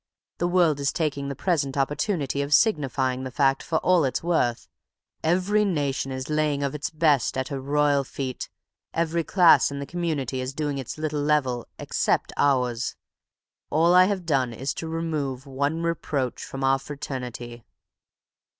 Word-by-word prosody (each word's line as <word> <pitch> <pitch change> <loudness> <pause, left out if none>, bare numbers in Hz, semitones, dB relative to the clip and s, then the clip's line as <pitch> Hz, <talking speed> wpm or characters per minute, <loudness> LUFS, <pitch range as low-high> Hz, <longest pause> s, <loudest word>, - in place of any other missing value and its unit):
The 175 - +1
world 175 -5 +3
is 140 0 +1
taking 140 -3 -2
the 140 - -4
present 145 -5 0
opportunity 145 +1 0
of 140 +1 +3
signifying 135 - +1
the 130 - -4
fact 135 +1 +2
for 160 - -1
all 180 -3 +5
it 130 - 0
is - - -9
worth. 130 -9 0 0.6
Every 185 +6 +2
nation 145 -8 -1
is 130 +1 -4
laying 150 -2 0
of 140 - -1
its 150 0 -3
best 155 -6 +2
at 130 0 -2
her 140 -2 -4
royal 145 0 +2
feet; 130 -1 -5 0.5
every 165 0 0
class 175 0 +5
in 140 - -6
the 140 - -4
community 145 -6 -2
is 130 +2 -5
doing 145 -2 -2
its 130 - -6
little 155 -1 -2
level—except 140 -5 0
ours. 125 -3 +1 0.7
All 165 +3 +3
I 185 0 +7
have 190 -2 -2
done 135 -6 +1
is 135 +4 -3
to 165 - -5
remove 155 -5 -3
one 140 +4 -1
reproach 145 -6 -2
from 135 0 -6
our 135 0 +3
fraternity." 125 -4 -6
145 Hz, 160 wpm, -25 LUFS, 135-160 Hz, 0.7 s, I